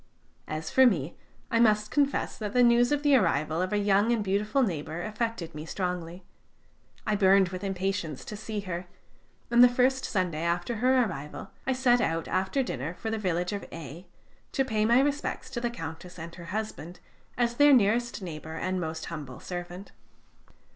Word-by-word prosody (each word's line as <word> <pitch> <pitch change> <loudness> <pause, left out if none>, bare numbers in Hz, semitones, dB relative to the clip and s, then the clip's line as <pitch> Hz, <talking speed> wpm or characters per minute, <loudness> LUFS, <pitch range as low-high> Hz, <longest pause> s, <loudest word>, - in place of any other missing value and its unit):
As 155 +1 -4
for 260 0 +7
me, 165 - 0 0.4
I 230 - +3
must 210 -2 +3
confess 285 -1 +1
that 210 -2 -4
the 250 - +5
news 240 +1 +5
of 290 0 +1
the 290 -2 +5
arrival 160 - +1
of 185 - -1
a 210 - +1
young 205 +2 +3
and 230 -3 +1
beautiful 210 +7 +1
neighbor 160 -4 -3
affected 215 -6 -3
me 150 0 -6
strongly. 180 0 -4 0.8
I 215 - +1
burned 195 -2 +5
with 185 +2 -6
impatience 190 -6 -2
to 210 - -6
see 215 0 -4
her, 180 -2 -5 0.6
and 240 +1 +7
the 250 - +8
first 260 +2 +2
Sunday 180 -6 -1
after 175 +7 -1
her 255 +2 +4
arrival 150 -9 -6 0.2
I 265 - +3
set 250 -2 +3
out 165 -6 -1
after 190 +9 0
dinner 155 - -4
for 220 - -4
the 220 - -1
village 180 -1 -1
of 200 - -4
A, 165 +2 -9 0.5
to 270 - +1
pay 215 -4 +1
my 235 +3 +5
respects 290 +1 -2
to 240 - -4
the 240 - 0
Countess 175 -4 -8
and 170 0 -8
her 170 -1 -10
husband, 185 -3 -5 0.4
as 240 -1 0
their 290 0 +7
nearest 235 -2 +3
neighbor 160 -2 -7
and 185 +2 -2
most 160 -1 -4
humble 145 -6 -7
servant. 175 +2 -7
195 Hz, 180 wpm, -28 LUFS, 170-235 Hz, 0.8 s, the